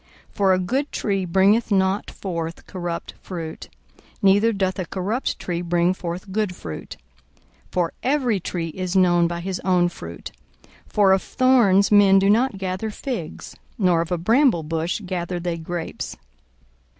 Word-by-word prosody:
42:006:043 - - -30
For 195 -2 +4
a - - +3
good 265 +11 -1
tree 195 -3 -1
bringeth 195 +6 +3
not 190 0 +1
forth 170 -3 -5
corrupt 175 -2 -5
fruit; 165 -4 -7 0.5
neither 205 +4 +5
doth 190 -2 -1
a 180 - -3
corrupt 205 +7 -2
tree 175 -1 -3
bring 175 +1 +2
forth 180 +2 -6
good 205 -2 -1
fruit. 80 - -8 0.7
42:006:044 - - -23
For 175 -2 0
every 255 -6 +1
tree 170 -1 -4
is 185 +2 -4
known 175 -2 +4
by 170 0 -4
his 185 0 -3
own 180 -2 +2
fruit. 85 - -9 0.6
For 200 -2 +3
of 190 0 +4
thorns 235 -7 +3
men 200 -2 +6
do 195 +1 +4
not 230 0 +2
gather 190 +3 -3
figs, 215 - -6 0.2
nor 180 -5 +3
of 165 - -5
a 180 - +1
bramble 225 - +3
bush 165 +5 -2
gather 180 -1 -3
they 170 -1 -3
grapes. 165 0 -5
185 Hz, 160 wpm, -23 LUFS, 175-205 Hz, 0.7 s, men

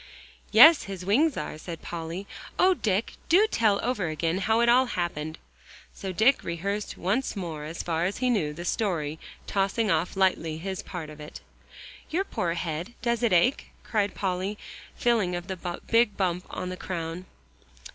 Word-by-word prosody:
"Yes, 320 -1 +8
his 190 -2 -6
wings 275 - +3
are," 155 - -4
said 165 0 -8
Polly. 170 +3 -5 0.3
"Oh, 370 +1 +5
Dick! 210 - -1 0.2
do 380 +6 +6
tell 220 - +2
over 235 -8 0
again 165 +3 -1
how 220 +3 +2
it 235 - +3
all 250 +2 +5
happened." 165 -6 -3 0.6
So 190 -2 -5
Dick 220 +9 +3
rehearsed 200 +5 -3
once 210 +10 -1
more 165 -6 -5
as 160 +2 -5
far 165 0 0
as 195 - -2
he 250 -1 +1
knew 170 -11 +1
the 170 +4 -7
story, 160 -7 -1 0.3
tossing 200 +2 +1
off 175 +3 0
lightly 175 -4 +1
his 190 +3 -4
part 165 -5 -7
of 150 - -12
it. 150 0 -9 0.7
"Your 355 +5 0
poor 170 - -2
head, 170 +6 -4
does 235 -1 +1
it 235 -3 +2
ache?" 180 +10 +3
cried 205 -2 0
Polly, 190 +2 -2 0.4
feeling 220 -7 +1
of 175 0 -5
the 180 -2 -5
big 230 -2 +4
bump 180 -2 -1
on 185 - -4
the 185 - -5
crown. 170 0 -5
185 Hz, 170 wpm, -27 LUFS, 170-225 Hz, 0.7 s, Yes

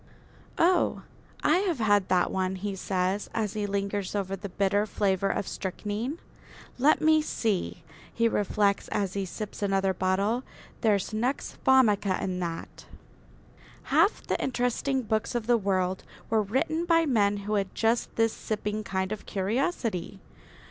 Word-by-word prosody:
"Oh, 355 +2 +2 0.4
I 315 +4 +4
have 370 -6 0
had 205 -4 +3
that 180 -1 +2
one," 190 0 -1
he 200 +1 -4
says, 190 +1 -1
as 215 -3 -1
he 210 -1 -2
lingers 200 0 -2
over 195 -1 -1
the 200 +1 -7
bitter 200 +2 +1
flavour 195 -2 +1
of 195 - -2
strychnine. 210 - -4 0.6
"Let 295 +4 +4
me 315 0 +5
see," 205 - -2 0.3
he 230 0 +2
reflects, 205 -2 +1
as 195 -3 -1
he 195 -1 -2
sips 210 +3 -7
another 195 -1 +1
bottle, 195 +7 0 0.4
"there's 210 -2 +1
nux 245 +6 -1
vomica 210 -7 +4
in 185 -1 -2
that." 170 -2 -6 1.1
Half 335 +8 +3
the - - -1
interesting 260 +1 0
books 220 +1 -1
of 235 -2 -1
the 240 +1 +4
world 190 -3 0 0.3
were 220 -1 +4
written 310 - 0
by 330 -1 +4
men 205 -7 +2
who 210 - -2
had 200 -2 -1
just 230 +1 +1
this 225 -1 +2
sipping 215 0 -3
kind 190 -1 -2
of 215 - -5
curiosity. 210 - -1
205 Hz, 150 wpm, -28 LUFS, 195-240 Hz, 1.1 s, me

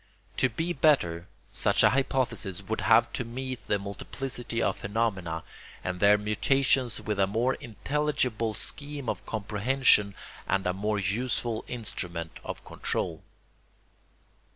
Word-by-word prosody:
To 130 - +4
be 165 +9 -2
better 90 - +2 0.2
such - - +2
a - - +7
hypothesis 130 -8 0
would 110 +3 -2
have 115 +1 +5
to - - -1
meet 125 0 -5
the 105 - +2
multiplicity 115 +4 -4
of - - +1
phenomena 95 -7 -1 0.4
and 90 0 -3
their 100 +1 +6
mutations 125 +4 +2
with 105 -2 -3
a 95 - +4
more 115 +6 +1
intelligible 125 -2 -1
scheme 145 0 -6
of - - -2
comprehension 105 0 +2 0.3
and 95 +1 +1
a 90 - +1
more 105 +2 -1
useful 110 +3 0
instrument 90 -8 -3
of - - -6
control. - - -2
110 Hz, 130 wpm, -28 LUFS, 100-130 Hz, 0.4 s, a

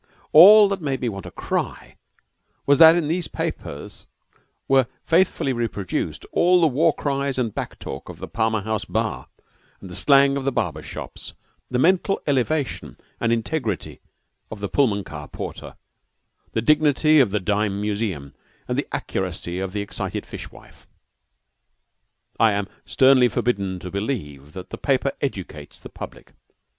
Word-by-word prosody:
All 205 +6 +9
that 195 -2 -2
made 140 -4 -2
me 125 - -1
want 100 -2 -7
to - - -7
cry - - -4 0.7
was 140 +1 +4
that 160 0 +9
in 170 -4 0
these 170 +2 -1
papers - - -6 0.6
were 135 -2 +4 0.2
faithfully 170 -5 +2
reproduced 115 -5 -3
all 180 +1 +4
the 170 - +4
war 160 +3 +3
cries 140 -2 -2
and 115 -5 -1
"back - - -5
talk" - - -8
of - - -9
the - - -7
Palmer 110 -1 0
House 110 +1 -2
bar, - - -3 0.5
the 90 -2 -10
slang 140 +2 +4
of 135 - -3
the 135 - 0
barber 85 - -2
shops, - - -9 0.4
the 125 - -1
mental 185 +7 +2
elevation 145 +1 -1 0.2
and 115 - 0
integrity 115 - -2 0.5
of 110 - -8
the 100 - -3
Pullman 105 -5 +1
car 75 -4 -9
porter, - - -8 0.8
the 110 - -1
dignity 155 +1 +4
of 130 -6 +4
the 105 +2 -1
dime 100 +1 -1
museum, 100 -9 -3 0.3
and - - -1
the - - -3
accuracy 85 +1 -3
of 95 -1 -3
the 105 +1 -3
excited 100 - -5
fish - - -8
wife. - - -18 1.5
I 110 -2 +5
am 100 -1 -2 0.2
sternly 130 -2 +5
forbidden 100 -7 -1
to 90 0 -8
believe 75 - -4
that 95 -1 -9
the - - -7
paper 135 0 +1
educates 90 - -5
the - - -12
public. - - -10
120 Hz, 155 wpm, -22 LUFS, 100-145 Hz, 1.5 s, All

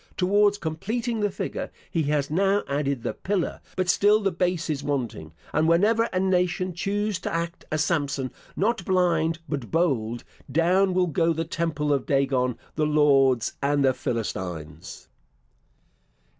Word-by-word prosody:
Towards 205 +2 +3
completing 215 +8 -3
the 205 -1 +1
figure, - - -4 0.2
he 165 - +1
has 145 -1 0
now 195 +4 +2
added 140 -3 -1
the - - -2
pillar; 190 -3 -2
but 185 -1 0
still 205 +4 +4
the 200 -2 0
base 175 -1 -1
is 150 -3 -2
wanting; 120 - -3 0.2
and 155 +1 +2
whenever 210 +7 +4
a 185 -5 -2
nation 185 -1 +1
choose 205 +2 -1
to - - -4
act 170 +1 -3
a 155 - +1
Samson, 145 -4 0 0.2
not 220 0 0
blind, 170 -3 +2
but 140 -6 -4
bold, 125 -9 0 0.3
down 180 +5 +3
will 185 0 +3
go 165 0 +1
the 165 +1 -2
temple 155 -3 -1
of 140 - -1
Dagon, 135 -3 +1 0.2
the 155 -1 0
Lords 135 -5 +3
and 140 0 +2
the 130 - +4
Philistines. 90 -10 -5
165 Hz, 150 wpm, -25 LUFS, 140-185 Hz, 0.3 s, still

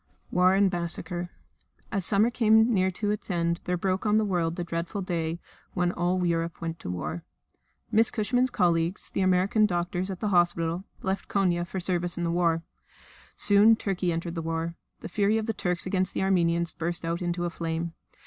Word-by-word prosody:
War 180 +1 +4
and 195 -1 +3
Massacre 175 0 -2 0.6
As 195 -5 +1
summer 215 +3 +3
came 220 0 +4
near 190 -2 +3
to 205 +3 -2
its 210 - -4
end 170 -1 0
there 180 0 0
broke 185 +1 -1
on 210 -1 +3
the 220 - +2
world 170 -4 0
the 175 - -3
dreadful 170 +4 -3
day 170 -2 -2 0.4
when 180 -1 +1
all 180 +1 0
Europe 170 -1 -1
went 165 0 -4
to - - -7
war. 90 -1 -4 0.7
Miss 225 +1 +4
Cushman's 245 +4 +1
colleagues, 175 -2 0
the - - -1
American 190 +3 +3
doctors 175 0 -2
at 190 -2 -5
the 210 - -1
hospital, 175 -1 +1 0.2
left 190 +1 -2
Konia 175 -3 +1
for 190 - -4
service 175 -1 -1
in 175 - -2
the 170 - 0
war. 170 -1 +1 0.7
Soon 210 +2 +5
Turkey 185 -4 -1
entered 165 +1 -3
the 165 - -3
war. 165 +1 -2 0.3
The - - -6
fury 205 +3 +1
of 220 - -1
the 225 - -1
Turks 180 -3 -1
against 185 0 0
the - - 0
Armenians 170 -3 +2
burst 170 0 -3
out 170 +2 -2
into 175 0 -1
a 175 - -2
flame. 165 -1 -3
180 Hz, 190 wpm, -27 LUFS, 170-195 Hz, 0.7 s, Soon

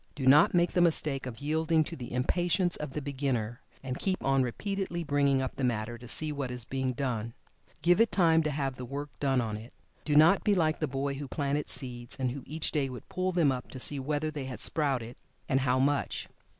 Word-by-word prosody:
Do 135 - -3
not 145 +6 +6
make 175 0 +3
the 180 - +2
mistake 150 -5 +2
of 115 -3 -8
yielding 160 +2 +2
to 165 - -7
the 125 -5 -8
impatience 175 +7 +1
of 150 -3 -6
the 150 - -4
beginner, 130 -5 -2 0.2
and 130 -1 -4
keep 190 -1 -1
on 135 0 +3
repeatedly 175 - -2
bringing 140 -3 +2
up 130 - -4
the 135 - -4
matter 120 -1 -1
to 120 - -11
see 155 +5 0
what 140 -3 -3
is 125 -2 -4
being 130 0 -2
done. 120 -3 -3 0.5
Give 175 +5 +5
it 230 - +3
time 165 -3 +4
to 155 - -1
have 135 -3 -2
the 125 - -6
work 145 +3 -5
done 135 -2 +2
on 110 -2 -3
it. 115 +3 -11 0.3
Do 150 - 0
not 160 +6 +6
be 205 -2 +3
like 160 -3 +1
the 155 - 0
boy 140 +1 -2
who 140 +1 -6
planted 145 +2 -2
seeds, 120 -2 -5
and 130 -2 -1
who 140 +2 -6
each 155 +2 -1
day 140 -4 0
would 125 -1 -9
pull 185 0 -1
them 170 -6 +3
up 125 -1 -4
to 130 - -7
see 140 +2 -1
whether 150 +3 -1
they 145 -3 -5
had 130 -1 -6
sprouted, 135 -7 0 0.3
and 135 - +2
how 130 -1 +2
much. 140 +2 0
140 Hz, 230 wpm, -30 LUFS, 130-155 Hz, 0.5 s, not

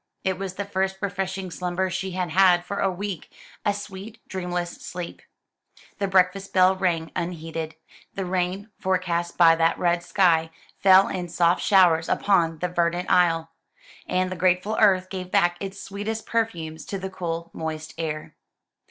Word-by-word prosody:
It 190 -1 -1
was 190 -1 -4
the 200 - -3
first 190 -1 -1
refreshing 190 -1 -3
slumber 180 +2 -2
she 190 +2 -3
had 180 -2 -2
had 180 0 +5
for 200 - -4
a 195 - +2
week 190 -1 -5 0.3
a 205 - +2
sweet 205 +2 -8
dreamless 175 -2 -3
sleep. 175 -1 -7 0.8
The 200 - 0
breakfast 190 +1 +2
bell 185 0 +5
rang 175 -4 -1
unheeded. 165 -2 -4 0.4
The 195 - -2
rain, 185 +3 -2
forecast 180 -2 -1
by 165 -1 +7
that 165 0 +2
red 175 -1 +1
sky, 170 -3 +2 0.3
fell 190 0 +7
in 180 -2 -4
soft 170 +1 +2
showers 175 -5 +4
upon 170 -5 +2
the 180 - -1
verdant 175 0 0
isle, 165 -2 +3 0.6
and 185 0 0
the - - -3
grateful 185 +4 +1
earth 190 -4 +4
gave 185 -2 -5
back 175 -3 +3
its 195 0 -6
sweetest 210 +3 -5
perfumes 170 -9 -2
to 200 - -4
the 190 0 -5
cool, 170 -2 -4
moist 160 -1 -5
air. 155 -2 -4
185 Hz, 160 wpm, -24 LUFS, 170-190 Hz, 0.8 s, by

